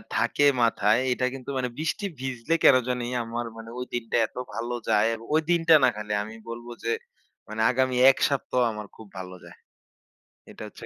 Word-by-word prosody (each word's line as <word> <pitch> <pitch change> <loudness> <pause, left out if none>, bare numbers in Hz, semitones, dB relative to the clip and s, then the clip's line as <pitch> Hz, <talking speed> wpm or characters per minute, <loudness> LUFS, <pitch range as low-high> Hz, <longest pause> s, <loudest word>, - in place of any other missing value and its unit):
থাকে 145 - +2 0.2
মাথায়, 110 -1 +3
এটা 125 +1 0
কিন্তু 135 0 -8
মানে 125 -1 -1
বৃষ্টি 160 +6 -2
ভিজলে 130 +3 -2
কেন 135 - +8
জানি 125 -1 -1 0.2
আমার 115 +1 -4
মানে 115 0 -9
ওই 125 - -3
দিনটা 120 -2 -3
এত - - -34 0.2
ভালো 120 +1 -3 0.2
যায়। 105 +2 +4
এবং 115 0 -8
ওই 160 - +4
দিনটা 165 -1 +4
না 130 - +6
খালি 105 0 -6
আমি 110 +2 -9
বলব 120 +1 -7 0.2
যে 115 - 0 0.6
মানে 110 +1 -4
আগামী 130 0 +1 0.2
১ 130 - -9
সপ্তাহ 135 -2 -1
আমার 105 -1 -7
খুব 110 - -13
ভালো 95 0 -7
যায়। - - -13 1.0
এটা - - -13
হচ্ছে - - -12
120 Hz, 190 wpm, -26 LUFS, 110-130 Hz, 1.0 s, কেন